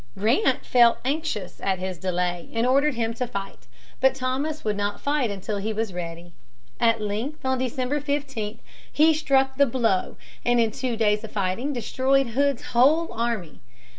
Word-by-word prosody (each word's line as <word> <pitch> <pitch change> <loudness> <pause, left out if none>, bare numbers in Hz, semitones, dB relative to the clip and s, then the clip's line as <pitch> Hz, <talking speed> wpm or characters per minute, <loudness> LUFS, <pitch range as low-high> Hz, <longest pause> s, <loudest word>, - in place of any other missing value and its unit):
Grant 230 - +2
felt 240 -2 +5
anxious 270 - -3
at 190 -1 +1
his 185 -1 -5
delay 180 -1 -2
and 230 +1 +1
ordered 275 +2 +3
him 230 -1 -1
to 245 +2 -3
fight. 195 - -7 0.3
But 265 0 +4
Thomas 270 +4 -2
would 210 -1 +1
not 205 0 -2
fight 285 -4 0
until 200 +1 -4
he 210 +2 -2
was 215 -2 -2
ready. 170 0 -7 0.5
At 230 -1 +3
length, 220 +9 -4
on 260 -1 +1
December 255 +3 -1
15, 270 -7 -3 0.3
he 315 +2 +5
struck 270 -3 +1
the 280 0 +5
blow, 225 -7 0 0.3
and 240 0 +3
in 225 -1 +2
two 245 0 -3
days 210 -1 +2
of 220 - -8
fighting 205 +8 -1
destroyed 260 +1 +1
Hood's 275 +1 +1
whole 295 +8 +4
army. 225 -8 -3
235 Hz, 165 wpm, -25 LUFS, 205-270 Hz, 0.5 s, felt